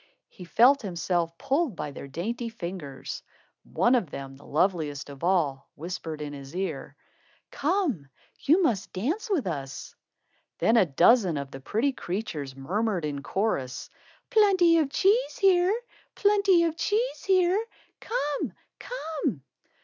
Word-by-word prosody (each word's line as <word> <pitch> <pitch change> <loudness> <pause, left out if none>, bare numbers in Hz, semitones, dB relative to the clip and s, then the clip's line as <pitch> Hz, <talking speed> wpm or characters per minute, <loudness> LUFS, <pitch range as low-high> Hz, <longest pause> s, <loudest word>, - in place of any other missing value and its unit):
He 180 - -11
felt 255 +9 +5
himself 175 -4 -1
pulled 275 - 0
by 150 - -4
their 140 - -8
dainty 230 - -3
fingers. 170 - -6 0.4
One 240 - +1
of 230 - +2
them, 135 -1 -7
the 140 - -17
loveliest 150 -4 0
of 140 +2 -12
all, 160 -7 +1
whispered 160 -1 -5
in 145 -1 -6
his 140 +2 -10
ear: 190 +1 -4 0.6
"Come, 290 - 0 0.3
you 335 +7 +4
must 220 - 0
dance 310 - -2
with 350 - +1
us." 140 -6 -5 0.6
Then 225 - +3
a 200 -6 +5
dozen 175 - +4
of 140 -1 -5
the 135 - -8
pretty 225 - 0
creatures 175 - -5
murmured 185 +5 -1
in 145 -2 -3
chorus: 140 - -2 0.4
"Plenty 370 -6 +5
of 300 -4 +1
cheese 425 - +2
here. 385 +2 +4 0.4
Plenty 400 -4 +4
of 330 -1 0
cheese 455 +7 0
here. 375 +2 +3 0.4
Come, 295 - -2 0.3
come!" 310 - -4
205 Hz, 135 wpm, -27 LUFS, -, 0.6 s, felt